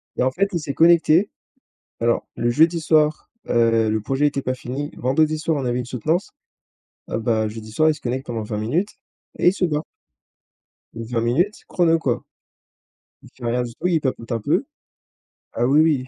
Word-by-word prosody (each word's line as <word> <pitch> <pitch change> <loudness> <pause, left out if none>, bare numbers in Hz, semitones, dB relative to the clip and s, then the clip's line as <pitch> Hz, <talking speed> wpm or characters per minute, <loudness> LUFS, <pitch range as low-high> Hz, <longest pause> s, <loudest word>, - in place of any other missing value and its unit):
Et - - 0
en 130 - +2
fait, 200 +8 +1
il 170 - 0
s'est 145 -2 -4
connecté. 170 +4 +4 0.7
Alors, 115 0 +1
le 120 +1 +1
jeudi 165 +6 +3
soir, 155 -1 +2 0.2
heu, 115 -2 +3
le 110 0 0
projet 135 +7 0
était 140 -1 -1
pas 130 - -1
fini. 130 +4 -5
Vendredi 155 +5 +1
soir, 155 -1 -1
on - - -4
avait 120 0 0
une 125 - -3
soutenance. 155 - -1 0.8
Ah - - -2
bah 110 -2 0
jeudi 110 0 -9
soir, 155 +7 +3
il - - 0
se 150 - -14
connecte 130 +2 -3
pendant 115 -2 -3
20 105 0 -4
minutes 160 - -1 0.4
et - - +4
il - - +5
se 190 - -1
barre. 150 -1 -2 1.1
20 115 +1 -3
minutes 165 - 0
chrono, 165 -2 +2
quoi. 125 -6 -1 1.0
Il - - -14
fait 125 - -12
rien 125 +1 +1
du 120 -1 -6
tout, 180 - -3
il 170 -3 +2
papote 130 -4 -3
un 115 - -1
peu. - - +1 0.9
Ah 120 - 0
oui, 140 +5 +5
oui. 145 -5 +2
135 Hz, 195 wpm, -22 LUFS, 120-160 Hz, 1.1 s, il